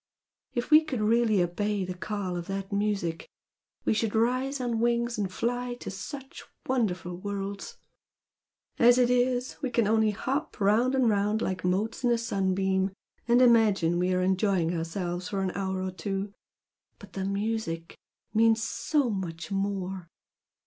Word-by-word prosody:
If 240 +4 -2
we 305 +1 +8
could 275 -6 -3
really 215 -2 +3
obey 200 +3 -1
the 185 - -4
call 190 0 -4
of 175 -1 -5
that 195 0 -4
music 200 -5 -1 0.6
we - - +3
should 220 0 -1
rise 255 +5 +1
on 240 -3 -1
wings 235 0 +1
and 195 -3 -1
fly 245 +4 -2
to 245 - -7
such 265 +9 -8 0.2
wonderful 185 -9 -1
worlds! 200 +1 -5 1.0
as 240 +1 +7
it 250 -1 +4
is, 250 0 +1
we 270 - -1
can 235 -3 +1
only 220 0 +3
hop 270 +9 -3
round 220 +6 +3
and 260 -2 +3
round 210 +1 +1
like 185 -1 -2
motes 200 +8 -1
in 245 - +3
a 235 - +3
sunbeam 190 -3 0 0.4
and 240 +2 +5
imagine 210 -8 +4
we 180 +1 +1
are 185 0 +1
enjoying 185 -2 +1
ourselves 175 +2 -3
for 195 -1 -2
an 185 - -1
hour 190 -1 -2
or 185 - -2
two! 195 +1 -4 0.6
But 205 -2 -14
the 190 - -3
music 200 -4 -2 0.4
means 225 0 +4
so 285 +1 0
much 175 -2 -5
more!" 195 -2 -2
205 Hz, 155 wpm, -28 LUFS, 190-235 Hz, 1.0 s, we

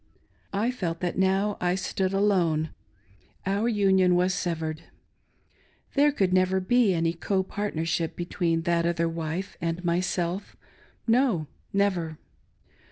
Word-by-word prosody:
I 220 +5 +1
felt 170 -9 -3
that 175 -1 -1
now 195 +2 +1
I 180 0 +2
stood 190 0 -1
alone 180 -6 +2 0.4
— 90 -1 -33
our 200 +4 +1
union 190 -4 +4
was 180 +1 +2
severed. 160 -3 -2 1.1
There 290 +1 +4
could 190 -9 +1
never 185 +1 +3
be 230 +3 +3
any 165 -1 +1
copartnership 175 -3 -1
between 170 -1 -1
that 170 -1 +1
other 170 -1 +1
wife 165 +4 -4
and 170 +1 -2
my 170 0 +2
self— 180 +1 -2 0.5
no, 230 - +3 0.3
never. 180 -6 0
180 Hz, 125 wpm, -27 LUFS, 165-195 Hz, 1.1 s, union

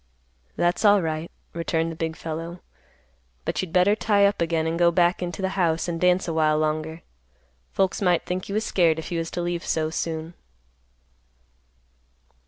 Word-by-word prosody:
"That's 175 +4 +1
alright," 170 -6 +3 0.2
returned 165 -1 -1
the - - -7
big 160 0 -3
fellow; 165 +2 -6 0.9
"But - - -1
you'd 185 -3 -6
better 185 +4 +4
tie 205 -2 +3
up 200 -2 +1
again 165 -1 +1
and 165 +1 -1
go 175 -1 +6
back 175 +2 +2
into 180 +2 -4
the 190 - +1
house 170 -4 0
and 165 -1 -3
dance 180 +1 +3
a 165 - -1
while 155 -1 +3
longer. 155 +1 -2 0.7
Folks 190 +1 0
might 180 -3 +2
think 185 +2 -4
you 200 - -3
was 215 0 0
scared 165 -4 +3
if 160 - -6
you 170 - -1
was 165 0 -3
to 175 - -3
leave 175 0 -2
so 155 -1 -1
soon." 160 0 -3
170 Hz, 175 wpm, -24 LUFS, 160-180 Hz, 0.9 s, go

